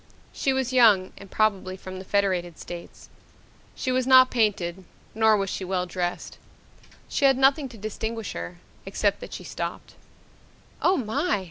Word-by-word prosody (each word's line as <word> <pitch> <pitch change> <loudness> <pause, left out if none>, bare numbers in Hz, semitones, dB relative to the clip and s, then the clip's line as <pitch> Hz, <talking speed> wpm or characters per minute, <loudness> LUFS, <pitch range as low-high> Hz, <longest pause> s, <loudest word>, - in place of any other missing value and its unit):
She 270 - 0
was 265 -1 -1
young 215 -7 +5
and 200 - -12
probably 195 -3 0
from 185 0 -8
the - - -8
Federated 185 -4 0
States. 175 -1 -10 0.7
She 255 - -2
was 255 0 0
not 255 -1 +7
painted 190 -6 0 0.3
nor 220 -1 +4
was 195 -1 -2
she - - -4
well 185 -1 -1
dressed. 175 0 -4 0.7
She 280 - 0
had 270 -1 +5
nothing 270 +1 +3
to 235 - -12
distinguish 220 +1 -4
her, 85 0 -6 0.3
except 200 +1 0
that - - -9
she - - -7
stopped. - - -6 0.9
"Oh, 370 +1 +3
my!" 215 -4 0
205 Hz, 155 wpm, -25 LUFS, 185-250 Hz, 0.9 s, not